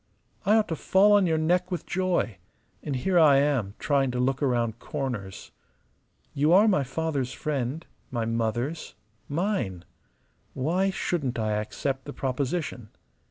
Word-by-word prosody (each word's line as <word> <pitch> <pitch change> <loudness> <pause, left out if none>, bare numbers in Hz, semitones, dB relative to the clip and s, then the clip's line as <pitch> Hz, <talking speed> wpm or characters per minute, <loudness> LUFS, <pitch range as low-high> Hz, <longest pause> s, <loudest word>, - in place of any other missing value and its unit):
I 210 - +6
ought 220 -1 +3
to 165 - -1
fall 195 +6 +4
on 205 -3 +5
your 160 -1 +2
neck 175 +3 +1
with 180 -4 -4
joy: 180 - 0 0.4
and 145 - -3
here 175 +8 +2
I 145 -4 +7
am 135 -8 +1
trying 140 -2 +1
to 125 0 -2
look 130 +2 0
round 120 -4 0
corners! 110 -10 -5 0.8
You 150 +3 +2
are 205 +4 +6
my 185 -9 +3
father's 135 -1 -2
friend, 145 +2 -3 0.2
my 120 -3 -2
mother's, 115 +7 -2 0.3
mine. 145 - -2 0.7
Why 175 +9 +1
shouldn't 155 -9 -2
I 110 -1 -1
accept 130 +6 -2
the 145 - -7
proposition? 130 -3 -3
140 Hz, 145 wpm, -26 LUFS, 125-175 Hz, 0.8 s, I